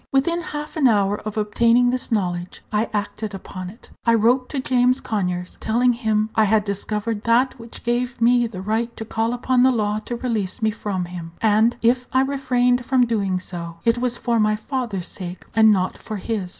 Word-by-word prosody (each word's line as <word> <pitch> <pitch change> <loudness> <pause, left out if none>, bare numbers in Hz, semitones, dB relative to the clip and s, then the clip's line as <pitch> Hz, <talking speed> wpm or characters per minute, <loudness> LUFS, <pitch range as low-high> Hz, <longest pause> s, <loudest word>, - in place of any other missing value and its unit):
Within 335 +6 +1
half 300 -1 -6
an 280 -4 +5
hour 205 -2 +2
of 215 - -5
obtaining 235 +3 +3
this 255 0 -3
knowledge, 180 -4 -2
I 215 +2 0
acted 210 0 -3
upon 185 -1 -7
it. 225 +6 -16
I 230 -1 +4
wrote 245 +3 +2
to 280 - -2
James 255 0 +2
Conyers, 180 -4 -3
telling 245 +3 +2
him 220 -2 0
I 220 - +4
had 215 0 +3
discovered 210 +2 -3
that 245 +3 +2
which 230 0 -9
gave 240 +1 -1
me 240 +1 +4
the 190 -4 -8
right 225 +3 -1
to 225 - -5
call 225 +1 -1
upon 245 +1 +1
the 260 - +6
law 210 -3 0
to 240 - -3
release 225 -6 -2
me 220 -1 +1
from 200 -4 -3
him; 170 -2 -8
and 220 +2 +3
if 245 +2 +2
I 260 - +4
refrained 250 -2 +1
from 255 0 +3
doing 200 -5 0
so, 170 -2 -7
it 230 +1 +3
was 245 -1 0
for 235 -2 0
my 215 0 +3
father's 220 -5 -3
sake, 180 -2 -7
and 220 -1 +6
not 185 -2 0
for 215 - -6
his. 200 -2 -3
225 Hz, 200 wpm, -22 LUFS, 205-245 Hz, -, the